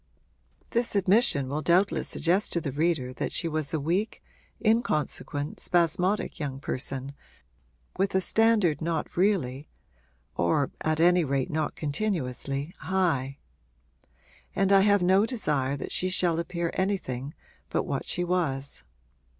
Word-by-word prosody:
This 235 Hz, -2 st, 0 dB
admission 195 Hz, -, +3 dB
will 145 Hz, +3 st, -2 dB
doubtless 180 Hz, +5 st, +2 dB
suggest 180 Hz, +6 st, +1 dB
to 170 Hz, -, +1 dB
the 145 Hz, -4 st, -4 dB
reader 145 Hz, -3 st, 0 dB
that -, -, -3 dB
she 170 Hz, -, -1 dB
was 155 Hz, -3 st, -2 dB
a 160 Hz, -, 0 dB
weak, 175 Hz, +9 st, -1 dB, 0.4 s
inconsequent, 155 Hz, -9 st, 0 dB
spasmodic 180 Hz, +4 st, +1 dB
young 140 Hz, -3 st, -4 dB
person, 135 Hz, 0 st, -4 dB, 0.9 s
with 195 Hz, 0 st, +1 dB
a -, -, +5 dB
standard 210 Hz, -6 st, +2 dB
not 165 Hz, -1 st, -2 dB
really, 160 Hz, -8 st, 0 dB, 0.7 s
or 85 Hz, +11 st, +1 dB
at 155 Hz, 0 st, 0 dB
any 175 Hz, +1 st, +5 dB
rate 135 Hz, -2 st, -1 dB
not 155 Hz, -1 st, -1 dB
continuously, 145 Hz, -, -2 dB
high; 160 Hz, -8 st, 0 dB, 1.2 s
and 195 Hz, 0 st, +2 dB
I 195 Hz, -1 st, +7 dB
have 205 Hz, -1 st, +4 dB
no 190 Hz, +4 st, +4 dB
desire 145 Hz, -, -1 dB
that -, -, -6 dB
she 185 Hz, -, 0 dB
shall 175 Hz, -3 st, +1 dB
appear 170 Hz, 0 st, -2 dB
anything 155 Hz, -9 st, -2 dB, 0.3 s
but -, -, 0 dB
what -, -, -3 dB
she 175 Hz, -, 0 dB
was. 160 Hz, -7 st, -2 dB
165 Hz, 135 wpm, -27 LUFS, 140-190 Hz, 1.2 s, I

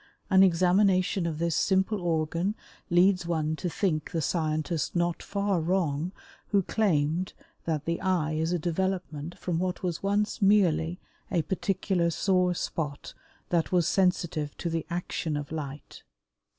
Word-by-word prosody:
An 190 Hz, 0 st, +7 dB
examination 185 Hz, 0 st, +3 dB
of 160 Hz, -2 st, -3 dB
this 170 Hz, 0 st, 0 dB
simple 190 Hz, +2 st, +1 dB
organ 170 Hz, +3 st, 0 dB, 0.3 s
leads 180 Hz, 0 st, +4 dB
one 160 Hz, -2 st, 0 dB
to 180 Hz, -, -2 dB
think 160 Hz, -4 st, -1 dB
the 165 Hz, -, -2 dB
scientist 155 Hz, 0 st, -1 dB
not 175 Hz, -1 st, 0 dB
far 200 Hz, -2 st, 0 dB
wrong 165 Hz, -2 st, 0 dB, 0.4 s
who 200 Hz, -2 st, +2 dB
claimed 175 Hz, -4 st, +1 dB, 0.3 s
that 155 Hz, -2 st, -1 dB
the 170 Hz, 0 st, -1 dB
eye 180 Hz, -5 st, +1 dB
is 160 Hz, +2 st, 0 dB
a 180 Hz, -, +2 dB
development 175 Hz, -2 st, -2 dB
from 170 Hz, -2 st, -2 dB
what 185 Hz, +1 st, -2 dB
was 175 Hz, -3 st, -2 dB
once 205 Hz, +3 st, 0 dB
merely 180 Hz, -4 st, +3 dB, 0.3 s
a 170 Hz, -4 st, +1 dB
particular 190 Hz, -2 st, 0 dB
sore 180 Hz, +1 st, +2 dB
spot 150 Hz, -4 st, -4 dB, 0.4 s
that 170 Hz, -2 st, +1 dB
was 175 Hz, -3 st, +3 dB
sensitive 170 Hz, -6 st, 0 dB
to 170 Hz, -, -3 dB
the 165 Hz, -1 st, -2 dB
action 170 Hz, -3 st, -2 dB
of 145 Hz, 0 st, -6 dB
light. 145 Hz, -2 st, -6 dB
175 Hz, 145 wpm, -28 LUFS, 160-190 Hz, 0.4 s, An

